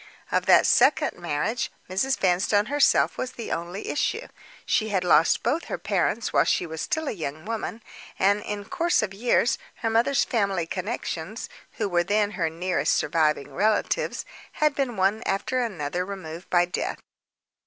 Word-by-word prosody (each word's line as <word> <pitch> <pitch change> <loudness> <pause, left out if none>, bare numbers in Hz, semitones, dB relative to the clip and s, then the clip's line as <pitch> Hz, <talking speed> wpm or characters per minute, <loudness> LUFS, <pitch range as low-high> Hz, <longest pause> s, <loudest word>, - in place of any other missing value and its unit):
Of - - +1
that - - +7
second - - +4
marriage 225 +11 -1 0.2
Mrs. 210 +9 0
Vanstone 190 +3 +2
herself 290 +4 +3
was 255 - -3
the 230 - -6
only 175 +4 -4
issue. 295 - -1 0.4
She 220 -1 +1
had 190 -3 0
lost 165 -2 +4
both 330 +3 0
her - - -4
parents - - -1
while - - +5
she - - +1
was 160 -1 -6
still 315 -1 -2
a - - 0
young 155 -3 -5
woman; 225 0 -4 0.3
and, 200 +2 +3
in 205 -1 -5
course 340 - +1
of 200 -2 -3
years, 230 +2 +2 0.2
her 225 - -2
mother's 240 +5 +3
family 200 -7 0
connections 190 +1 -4 0.2
(who 215 - -2
were 175 -2 +2
then 205 +2 +1
her 170 -6 -1
nearest 165 -2 0
surviving 150 -2 +1
relatives) 215 - 0 0.3
had 300 -1 +2
been 265 -6 -2
one 195 +4 +2
after 250 +6 0
another 180 -7 -2
removed 180 -3 -8
by 175 -1 +4
death. 180 - -3
200 Hz, 165 wpm, -25 LUFS, 175-230 Hz, 0.4 s, that